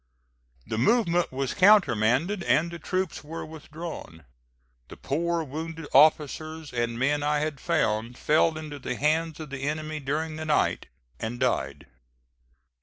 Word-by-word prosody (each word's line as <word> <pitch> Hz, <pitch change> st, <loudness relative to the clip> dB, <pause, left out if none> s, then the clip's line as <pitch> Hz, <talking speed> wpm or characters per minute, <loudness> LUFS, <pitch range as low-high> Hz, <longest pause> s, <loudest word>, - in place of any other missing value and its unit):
The 110 Hz, -, -3 dB
movement 175 Hz, -, +2 dB
was 130 Hz, 0 st, -2 dB
countermanded 175 Hz, -, +4 dB
and 170 Hz, +2 st, +2 dB
the 170 Hz, -, -7 dB
troops 185 Hz, 0 st, -2 dB
were 160 Hz, +3 st, -6 dB
withdrawn. 155 Hz, -, -9 dB, 0.6 s
The -, -, -11 dB
poor 170 Hz, +3 st, -1 dB
wounded 160 Hz, +2 st, -6 dB
officers 155 Hz, +2 st, +3 dB
and 120 Hz, -1 st, -1 dB
men 145 Hz, +4 st, +1 dB
I 150 Hz, +1 st, +1 dB
had 150 Hz, -1 st, -2 dB
found, 110 Hz, +3 st, 0 dB
fell 155 Hz, +1 st, +2 dB
into 150 Hz, -2 st, -7 dB
the 125 Hz, -, -4 dB
hands 155 Hz, +3 st, 0 dB
of 155 Hz, -3 st, -8 dB
the 140 Hz, -1 st, -5 dB
enemy 155 Hz, +2 st, -3 dB
during 155 Hz, +3 st, -2 dB
the 155 Hz, -, -5 dB
night, 155 Hz, -, +1 dB, 0.3 s
and 115 Hz, +2 st, -4 dB
died. 70 Hz, -, -1 dB
155 Hz, 140 wpm, -27 LUFS, 135-160 Hz, 0.6 s, countermanded